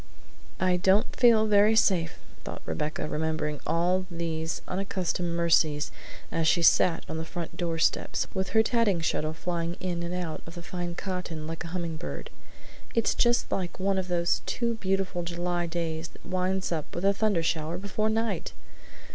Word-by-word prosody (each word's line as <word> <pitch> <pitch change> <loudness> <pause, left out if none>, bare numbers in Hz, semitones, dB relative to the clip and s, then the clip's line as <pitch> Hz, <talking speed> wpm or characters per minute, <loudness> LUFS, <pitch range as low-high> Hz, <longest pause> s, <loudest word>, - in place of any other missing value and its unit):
"I 185 0 +3
don't 190 +5 +3
feel 230 -3 +6
very 210 +1 +5
safe," 180 -6 +3 0.3
thought - - -7
Rebecca, 115 - -2
remembering 155 -1 -1
all 180 +3 +1
these 165 -2 -3
unaccustomed 180 -2 -1
mercies 155 -3 +3 0.4
as 165 -1 +1
she 170 +2 +3
sat 165 +1 +5
on 160 - -4
the - - -2
front 170 0 -6
doorsteps, 165 -2 0
with 190 0 -1
her 220 0 +4
tatting 220 -7 +2
shuttle 155 -1 0
flying 170 0 -2
in 175 -2 -2
and 170 0 -3
out 175 -3 -3
of 165 - -9
the 175 - -8
fine 175 -1 -4
cotton 180 -5 -4
like 165 +1 -5
a - - -6
hummingbird. 170 -1 -5 0.6
"It's 230 -2 +3
just 240 0 +2
like 180 -1 -2
one 195 0 +1
of 185 - -3
those 170 -1 +1
too 235 -1 0
beautiful 195 -4 -1
July 175 0 -2
days 165 -1 -3
that - - -18
winds 185 +1 -1
up 160 -3 -3
with 175 - -2
a 200 - +5
thundershower 170 -5 0
before 205 +2 -1
night! 220 -4 -1
175 Hz, 165 wpm, -28 LUFS, 165-190 Hz, 0.6 s, feel